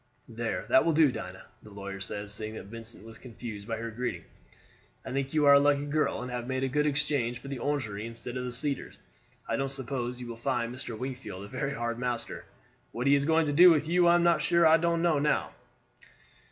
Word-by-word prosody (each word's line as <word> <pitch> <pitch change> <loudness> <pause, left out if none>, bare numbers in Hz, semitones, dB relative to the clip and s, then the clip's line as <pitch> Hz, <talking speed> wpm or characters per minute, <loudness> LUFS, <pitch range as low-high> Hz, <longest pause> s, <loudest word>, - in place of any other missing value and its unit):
"There, 115 -1 -3
that 220 - +6
will 165 - +2
do, 155 -3 +5
Dinah," 95 -5 -7 0.2
the 105 - -14
lawyer 100 -1 -7
said, 100 +1 -5
seeing 110 +1 -5
that - - -8
Vincent 115 -2 -7
was 115 0 -12
confused 115 -4 -8
by 115 -1 -2
her 115 +1 -5
greeting. 115 -6 -4 0.8
"I - - -6
think 135 +1 -2
you 150 -1 +4
are 140 - +8
a 140 - +8
lucky 145 0 +2
girl, 150 -1 0
and 125 - -6
have 120 -1 -4
made 130 0 -1
a - - +2
good 150 +3 +1
exchange 140 -4 0
for 135 +3 -10
the 135 -2 -4
Orangery 115 -6 -2
instead 115 +1 -8
of 125 - -3
the 125 - -4
Cedars. 140 +3 -2 0.5
I - - 0
don't 135 0 -1
suppose 125 -2 -3
you 125 - -6
will 120 -1 -7
find 120 -1 -1
Mr. 120 -3 -6
Wingfield 125 -6 -6
a - - -8
very 135 +4 -3
hard 120 -1 -3
master. 125 -2 -3 0.5
What 120 +2 -4
he 140 - +5
is 140 0 +3
going 160 +1 +3
to 145 - -1
do 180 +5 +9
with 155 -2 +3
you 175 +1 +4
I 170 - +6
am 170 -2 +4
sure 170 +2 +3
I 160 0 +7
don't 170 0 0
know." 150 -3 +2
130 Hz, 225 wpm, -29 LUFS, 115-145 Hz, 0.8 s, do